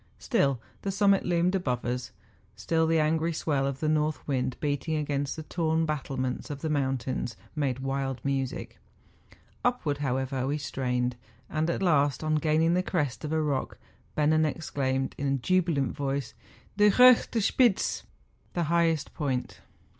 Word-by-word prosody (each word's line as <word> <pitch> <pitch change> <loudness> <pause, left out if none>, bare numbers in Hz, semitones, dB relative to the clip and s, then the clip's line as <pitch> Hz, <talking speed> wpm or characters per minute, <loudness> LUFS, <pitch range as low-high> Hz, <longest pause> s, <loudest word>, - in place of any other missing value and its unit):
Still 135 -3 +1 0.2
the 200 - -3
summit 195 0 +3
loomed 175 +1 +2
above 130 -11 -1
us; 125 0 -3 0.4
still 160 +9 +1
the 165 0 +3
angry 160 +2 +1
swell 145 -4 0
of 140 0 -4
the 155 - 0
north 155 -2 0
wind 130 -3 -1
beating 145 +2 -1
against 145 -2 -1
the 160 - -6
torn 160 0 0
battlements 135 -4 -3
of 145 -1 -6
the 160 - -1
mountains, 130 -4 -1 0.2
made 140 -5 0
wild 135 -1 -2
music. 135 -2 -2 0.8
Upward, 180 - 0
however, 130 -1 -1
we 145 +2 0
strained; 125 -3 -2 0.3
and 155 +1 0
at 170 - -1
last, 145 -5 +2
on 155 0 0
gaining 155 +2 +2
the 180 - +3
crest 150 -9 -2
of 150 - -3
a 160 - +1
rock, 145 -4 -1 0.4
Bennen 155 +1 +3
ex¬ 165 - -9
claimed, 135 -1 0
in 140 - -1
a 135 0 +1
jubilant 165 -1 +1
voice, 140 -2 -2 0.4
'Die 210 0 +6
hochste 250 +1 +6
Spitze 225 0 +2
!^— - - -26 0.5
the 175 - 0
highest 165 -3 +1
point. 135 -5 -3
145 Hz, 160 wpm, -28 LUFS, 135-165 Hz, 0.8 s, Die